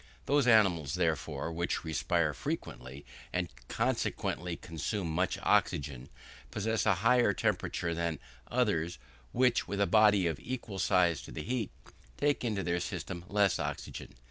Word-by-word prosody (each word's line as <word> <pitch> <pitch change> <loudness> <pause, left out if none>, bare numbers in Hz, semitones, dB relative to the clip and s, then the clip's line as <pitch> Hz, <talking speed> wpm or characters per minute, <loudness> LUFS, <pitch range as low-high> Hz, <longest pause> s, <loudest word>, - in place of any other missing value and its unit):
Those 140 -2 +3
animals, 90 - +4
therefore, 80 -3 -1
which 85 +1 -2
respire 80 -2 +1
frequently, 65 +3 -5 0.3
and 90 -2 -1 0.2
consequently 85 -1 -1
consume 85 +4 -3
much 90 +3 0
oxygen, 70 -2 +1 0.4
possess 110 +2 -1
a 105 - +5
higher 120 -3 +5
temperature 85 -2 -1
than 85 -2 -1 0.3
others, 100 -9 +1 0.3
which, 125 -1 +2
with 100 0 -3
a 100 - +4
body 105 -3 +5
of 80 -4 -1
equal 115 -6 -5
size 90 -4 +3
to - - -10
be 75 - -5
heated, 120 0 -2 0.5
take 145 -2 +1
into 105 -5 -1
the 85 0 0
system 85 0 -5
less 100 -4 +2
oxygen. - - -5
90 Hz, 140 wpm, -31 LUFS, 80-110 Hz, 0.5 s, a